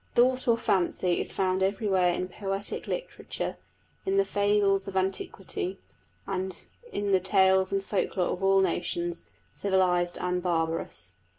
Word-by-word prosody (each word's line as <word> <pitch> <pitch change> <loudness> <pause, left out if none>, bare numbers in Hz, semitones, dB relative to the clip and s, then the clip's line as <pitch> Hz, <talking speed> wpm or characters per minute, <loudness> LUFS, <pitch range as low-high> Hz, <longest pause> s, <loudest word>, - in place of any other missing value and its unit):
The 240 - +7
thought 255 0 0
or 230 -1 +5
fancy 180 -3 +1
is - - -5
found 185 0 0
everywhere 190 -2 +2
in 180 +1 -2
poetic 195 +1 -4
literature, - - -4 0.5
in 390 0 0
the 395 - +4
fables 200 - +2
of 190 -1 -3
antiquity, 190 0 -2 0.5
in 195 - -4
the 190 - +5
tales 190 0 +4
and 195 0 0
folk 200 0 -1
lore 180 - +2
of 180 - -6
all 195 0 +5
nations, 175 -1 -1 0.2
civilised 180 -3 +1
and 180 0 -1
barbarous. 165 - -2
190 Hz, 140 wpm, -28 LUFS, 180-200 Hz, 0.5 s, The